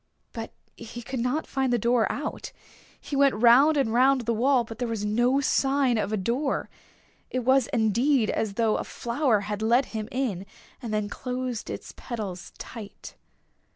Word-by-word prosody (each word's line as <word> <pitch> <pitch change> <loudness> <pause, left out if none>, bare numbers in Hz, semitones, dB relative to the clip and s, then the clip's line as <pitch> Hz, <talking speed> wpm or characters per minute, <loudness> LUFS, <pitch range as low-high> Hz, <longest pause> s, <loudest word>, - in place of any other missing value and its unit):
But 225 -2 -6 0.2
he 235 +1 -9
could 260 +2 -4
not 250 +6 -1
find 265 -2 -1
the 240 - +3
door 235 0 +2
out. 295 +3 -5 0.5
He 285 - -6
went 275 -3 +4
round 250 +7 +6
and 225 -6 +1
round 260 +2 +4
the 235 0 -1
wall, 250 +2 +3
but 225 0 -10
there 245 - -1
was 225 -3 -3
no 240 +6 +2
sign 270 -3 +2
of 210 - -2
a 215 - 0
door. 245 +9 -1 0.6
It 255 - -2
was 260 0 +3
indeed 235 0 +2
as 210 -3 -2
though 225 -1 +2
a - - -3
flower 235 -3 0
had 210 +1 -4
let 235 +4 +3
him 215 0 -4
in 220 -8 -2 0.3
and 235 -4 -5
then 210 -1 -1
closed 250 +1 -4
its - - -7
petals 205 -7 -6
tight. 220 -4 -9
240 Hz, 175 wpm, -26 LUFS, 220-265 Hz, 0.6 s, round